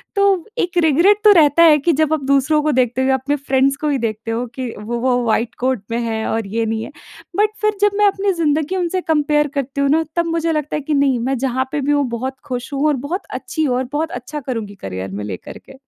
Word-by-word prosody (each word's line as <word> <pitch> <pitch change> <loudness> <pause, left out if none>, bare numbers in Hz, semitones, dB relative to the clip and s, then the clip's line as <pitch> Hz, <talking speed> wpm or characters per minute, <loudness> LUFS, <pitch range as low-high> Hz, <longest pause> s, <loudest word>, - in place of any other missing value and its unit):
तो 400 -1 +4
व 345 - -9
एक 355 0 -1
रिग्रेट 335 +7 +4
तो 425 - +8
रहता 300 +3 +4
है 315 -3 +7
कि 335 +4 +2
जब 310 +1 +1
आप 310 -3 -1
दूसरों 280 +2 +3
को 305 - +2
देखते 255 -1 +1
हो 260 - +1
या 265 - +4
अपने 265 +3 -1
फ्रेंड्स 275 -1 +1
को 300 +1 -2
ही 285 - +1
देखते 220 +1 -5
हो 235 +2 -2
कि 255 -3 -4
वो 235 +3 -4
वो 250 0 +1
व्हाइट 230 +1 0
कोट 255 -4 0
में 230 - 0
है 225 -1 -2
और 225 -2 -2
ये 225 +3 -1
नहीं 220 0 -2
है। - - -8 0.5
बट 420 +1 +4
फ़िर 425 -1 +1
जब 415 - +4
मैं 420 - +4
अपनी 395 0 +1
जिंदगी 300 +4 0
उनसे 365 0 -1
कंपेयर 295 -2 +1
करती 280 0 -2
हूँ 280 - +2
ना 320 +3 +3
तब 340 -1 +1
मुझे 330 0 0
लगता 300 -2 -2
है 300 - -2
कि 300 +2 -2
नहीं, 275 -3 +2
मैं 260 +3 -1
जहाँ 260 +1 -1
पे 295 - -1
भी 285 - 0
हूँ 290 -1 +2
बहुत 255 +3 -4
खुश 250 0 -5
हूँ 280 +2 0
और 300 - +2
बहुत 360 +6 -2
अच्छी 315 - -3
हूँ 260 -5 +1
और 255 - 0
बहुत 315 +2 -1
अच्छा 250 +5 -6
करूँगी 225 -7 -5
करियर 95 - -6
में 100 +2 -5
लेकर 95 -4 -7
के। - - -11
280 Hz, 260 wpm, -19 LUFS, 245-315 Hz, 0.5 s, तो